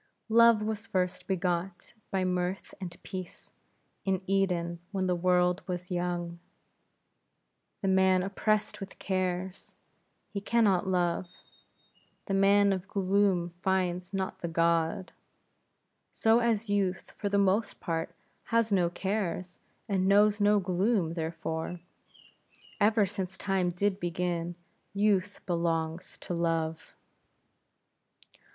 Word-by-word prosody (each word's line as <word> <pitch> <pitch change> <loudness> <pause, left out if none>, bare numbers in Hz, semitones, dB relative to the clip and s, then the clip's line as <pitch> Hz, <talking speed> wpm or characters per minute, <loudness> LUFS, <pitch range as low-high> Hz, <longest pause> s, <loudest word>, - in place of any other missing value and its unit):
Love 230 -1 +6
was 215 0 -3
first 180 -1 -1
begot 180 -1 -2 0.2
by 190 -1 0
Mirth 180 +1 -2
and 175 -2 -6
Peace, 185 -2 -7 0.5
in 190 -1 0
Eden, 180 -3 0
when 190 -2 -1
the 180 -1 +1
world 180 +1 +2
was 180 0 -4
young. 175 -1 -2 1.4
The - - +1
man 190 -1 +4
oppressed 210 +2 0
with 195 -1 -8
cares, 185 0 -3 0.6
he 200 - -3
can 235 +3 +2
not 190 -3 +3
love; 180 -1 +1 1.0
the 195 - -2
man 200 +1 +5
of 190 0 -4
gloom 195 -3 +1
finds 180 -1 0
not 190 -1 -3
the 170 - -3
god. 170 +3 +1 1.0
So, 225 +1 +4
as 230 -2 +1
youth, 195 -3 -1
for 205 - -1
the 200 - +1
most 200 +2 +1
part, 165 -3 -3 0.3
has 230 -2 +1
no 180 -3 +3
cares, 185 -1 -3 0.3
and 190 -3 +1
knows 205 +1 +4
no 205 0 +5
gloom, 185 -1 +1
therefore, 160 +1 -4 1.0
ever 210 0 +4
since 190 -1 -5
time 190 -2 0
did 190 +3 0
begin, 175 -1 -2 0.4
youth 205 -1 +1
belongs 165 -1 -2
to - - -4
love. 165 -1 -2
185 Hz, 120 wpm, -29 LUFS, 175-200 Hz, 1.4 s, Love